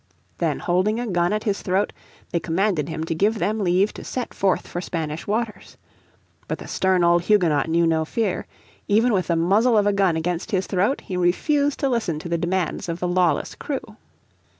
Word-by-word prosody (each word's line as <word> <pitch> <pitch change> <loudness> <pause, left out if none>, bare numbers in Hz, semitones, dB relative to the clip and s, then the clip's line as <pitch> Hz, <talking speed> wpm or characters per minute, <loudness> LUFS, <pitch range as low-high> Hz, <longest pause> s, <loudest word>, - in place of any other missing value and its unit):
Then - - 0
holding 185 +5 +1
a 245 - -2
gun 175 -4 +1
at 215 0 -1
his 205 -2 -1
throat 190 +2 0 0.4
they 170 - +1
commanded 170 -1 0
him 160 0 -3
to 165 - -2
give 205 +7 +1
them 210 +4 -1
leave 190 +1 +2
to - - -9
set 250 -2 -4
forth 195 -2 +1
for 175 - -4
Spanish 160 -3 -4
waters. 220 +1 -3 0.7
But - - -2
the - - -10
stern 185 -2 +2
old 170 0 +3
Huguenot 165 -8 +3
knew 170 +1 +3
no 160 -1 +2
fear. 200 +3 -2 0.4
Even 225 +4 +3
with 185 -3 +1
the 170 - +1
muzzle 210 +8 +3
of 205 - +3
the 205 - +3
gun 195 -4 +2
against 170 +4 -2
his 190 -4 0
throat 200 +9 0
he 185 - -6
refused 285 - +1
to 275 - +2
listen 220 -10 -1
to 165 +3 -7
the 170 0 0
demands 175 0 -1
of 170 +1 -3
the 180 - -1
lawless 175 -1 +1
crew. 265 -7 -5
185 Hz, 200 wpm, -23 LUFS, 170-210 Hz, 0.7 s, old